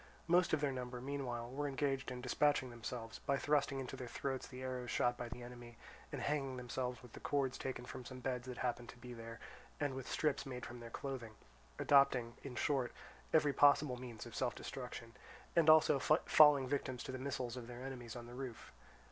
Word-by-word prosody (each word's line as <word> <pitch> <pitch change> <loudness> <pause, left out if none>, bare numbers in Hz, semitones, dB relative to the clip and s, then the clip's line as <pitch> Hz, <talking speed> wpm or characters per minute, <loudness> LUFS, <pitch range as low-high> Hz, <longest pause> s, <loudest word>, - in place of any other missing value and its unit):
Most 175 +1 +4
of 155 - +2
their 145 -2 +2
number, 125 -1 -4
meanwhile, 125 -3 -3
were 145 +2 -1
engaged 135 -1 0
in 125 0 -5
dispatching 130 0 +2
themselves 115 -1 -6
by 140 - +1
thrusting 140 -1 +2
into 130 -2 -4
their 125 - -6
throats 130 +2 -3
the 130 -1 -8
arrows 125 -1 -3
shot 120 0 +2
by 120 -1 -5
the 125 0 -7
enemy, 120 -1 -10 0.3
and - - -3
hanging 135 -3 0
themselves 125 0 -3
with 125 - -13
the - - -8
cords 135 -3 0
taken 130 -2 -4
from 125 - -7
some 130 +1 -8
beds 125 -1 -2
that 125 -1 -5
happened 120 -1 -2
to - - -10
be 125 0 -8
there, 115 0 -8 0.4
and 145 -2 0
with 130 -1 -5
strips 150 -3 +1
made 125 -3 -5
from 120 0 -8
their 120 0 -8
clothing; 120 -3 -5 0.4
adopting, 130 -4 +4
in 135 -3 -7
short, 130 -2 +1 0.4
every 150 -3 +4
possible 145 -2 +5
means 120 -3 -7
of 120 - -9
self 125 -2 0
destruction, 125 -3 -6 0.4
and 165 -2 +6
also 155 -3 +7
falling 150 -2 +6
victims 130 -2 -2
to - - -5
the 130 - -4
missiles 130 -3 -2
of 120 -2 -6
their 120 +1 -7
enemies 125 -3 -6
on 120 -1 -6
the 120 - -10
roof. 125 -3 -6
130 Hz, 205 wpm, -38 LUFS, 120-140 Hz, 0.4 s, also